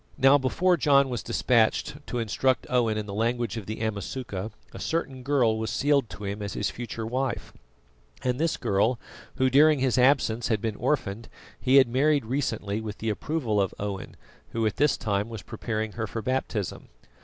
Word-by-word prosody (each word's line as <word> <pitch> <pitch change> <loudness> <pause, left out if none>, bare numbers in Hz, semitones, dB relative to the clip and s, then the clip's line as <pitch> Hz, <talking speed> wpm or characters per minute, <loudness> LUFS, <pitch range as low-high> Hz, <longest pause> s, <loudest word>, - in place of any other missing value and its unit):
Now, 135 +2 +6
before 175 +7 +2
John 140 -3 +4
was 120 -5 -3
despatched 125 +7 +1
to 125 - -3
instruct 120 +3 +1
Owen 115 -4 +2
in 105 - -3
the 100 - -7
language 120 +2 -1
of 110 -4 -6
the 110 +1 -5
Amasuka 110 -1 -4 0.2
a - - -8
certain 135 -6 -2
girl 125 -5 +2
was 110 - -2
sealed 140 -4 +2
to 105 - -9
him 100 +1 -4
as 100 -1 -4
his 100 -6 -1
future 115 +2 -5
wife, 130 +1 -2 0.7
and 125 0 0
this 165 0 +1
girl, 110 +5 +1 0.4
who 130 - +2
during 150 +4 +5
his 130 -2 +1
absence 125 -3 +3
had 110 -2 +1
been 110 0 -2
orphaned, 115 -5 -1 0.3
he 130 +1 +2
had 135 -2 +8
married 140 +2 +2
recently 110 -5 -2
with 110 -1 -6
the 110 0 -1
approval 115 -3 -1
of 95 - -1
Owen, 100 -1 -5 0.4
who 115 -1 0
at 110 - -1
this 145 -1 +3
time 100 0 -1
was 115 -3 -7
preparing 110 -2 -3
her 110 +1 -4
for 115 +1 -5
baptism. 120 -5 -2
115 Hz, 185 wpm, -27 LUFS, 110-135 Hz, 0.7 s, had